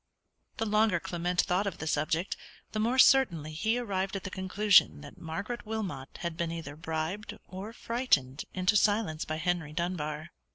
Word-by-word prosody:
The 225 - 0
longer 210 -4 +3
Clement 175 0 0
thought 190 +3 0
of 200 - -3
the - - -5
subject, 160 +4 0 0.4
the 215 - -2
more 235 +4 +1
certainly 175 - +5
he 220 +9 +1
arrived 195 -5 -2
at 195 - -4
the 185 - -5
conclusion 190 -2 +4
that 145 -1 -12
Margaret 200 +9 -4
Wilmot 200 -12 -5
had 170 -1 -2
been, 170 -1 -2
either 160 -4 -6
bribed 160 +5 -4
or 190 +4 -7
frightened 230 - 0
into 185 +2 +1
silence 205 -6 +2
by 155 - -3
Henry 160 -2 -1
Dunbar. 155 -2 -3
180 Hz, 165 wpm, -30 LUFS, 160-210 Hz, 0.4 s, certainly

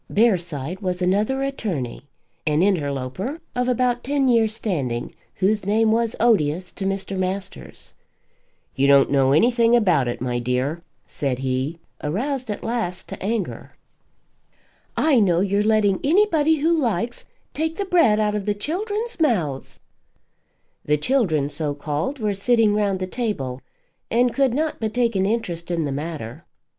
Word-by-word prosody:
Bearside 175 - +1
was 185 -3 -2
another 210 +9 +1
attorney, 160 - -4 0.4
an 155 +3 +3
interloper 170 - -1 0.2
of 250 0 0
about 245 -1 +1
ten 280 0 +1
years' 225 -3 +3
standing, 135 - -3 0.2
whose 205 +3 +1
name 220 +3 +2
was 230 0 +1
odious 180 -6 +2
to 195 - -5
Mr. 195 0 -3
Masters. 190 +1 -5 0.8
"You 135 +1 +2
don't 140 -1 +5
know 135 -1 +3
anything 235 - +4
about 180 - +3
it, 120 - -3
my 125 -1 -2
dear," 125 +7 -1 0.2
said 135 -3 -2
he, 130 +4 -2 0.3
aroused 245 - -2
at 210 - -4
last 225 -6 -3
to - - -7
anger. 215 -1 -3 1.2
"I 295 -6 +4
know 180 -5 +3
you're 200 +2 +1
letting 210 -3 +2
anybody 320 -2 +3
who 315 +3 +2
likes 235 -1 -1 0.3
take 320 +1 -2
the 400 - -2
bread 335 - +4
out 210 -1 +1
of 210 -1 -3
the 205 - +1
children's 410 - -3
mouths." 175 - 0 1.0
The 150 0 +2
children, 160 - +1
so 145 -1 -2
called, 150 - -3
were 210 -4 -1
sitting 220 +1 +3
round 205 -2 +1
the 185 - -3
table 180 - -3 0.5
and 245 +1 +2
could 270 -3 +2
not 310 +1 -1
but 220 0 -3
take 235 -3 +1
an 190 0 +2
interest 180 -7 -2
in 170 -3 0
the 140 - -2
matter. 145 -1 -5
200 Hz, 150 wpm, -22 LUFS, 155-240 Hz, 1.2 s, don't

